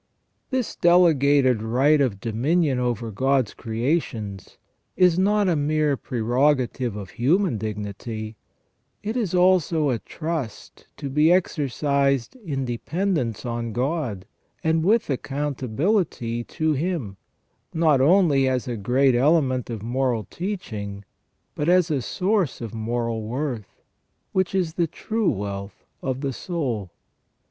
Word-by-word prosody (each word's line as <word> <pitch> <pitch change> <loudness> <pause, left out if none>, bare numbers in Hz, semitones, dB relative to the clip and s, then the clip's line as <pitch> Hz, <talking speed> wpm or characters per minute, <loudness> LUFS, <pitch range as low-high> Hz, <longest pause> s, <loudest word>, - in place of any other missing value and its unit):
This 260 -4 -2
delegated 145 -8 +4
right 135 +7 +3
of 115 -8 0
dominion 130 - +1
over 120 -2 -2
God's 130 +1 +1
creations 115 - -3 0.4
is 180 -1 +4
not 205 +1 +3
a 175 - +2
mere 150 0 +1
prerogative 125 -1 0
of 100 -3 -7
human 150 - +1
dignity, 110 +1 -5 0.7
it 215 +3 -3
is 210 -8 -1
also 175 -5 +3
a 120 - -1
trust, 155 -7 -6
to 140 - -5
be 150 +3 +2
exer 170 -4 +2
cised 140 - +1
in 135 -7 -2
dependence 125 - -2
on 115 -1 -3
God, 125 - -2 0.4
and 160 0 +2
with 220 +5 +3
accountability 135 - -1
to 155 -1 0
Him, 145 - -2 0.5
not 155 -5 +3
only 150 -4 +4
as 130 -1 -1
a 120 -2 -3
great 130 +6 +3
element 130 -1 +2
of 110 -3 -5
moral 120 -1 0
training, 105 - -5 0.5
bnt 150 - -2
as 180 -1 +4
a 140 -3 +1
source 190 - 0
of 115 -1 -6
moral 115 0 -2
worth, 120 -1 -5 0.5
which 190 0 0
is 175 -4 0
the 170 -1 +1
true 220 +6 -1
wealth 100 0 -5 0.2
of 130 0 -2
the 135 -2 -2
soul. 125 - -3
135 Hz, 125 wpm, -24 LUFS, 115-165 Hz, 0.7 s, delegated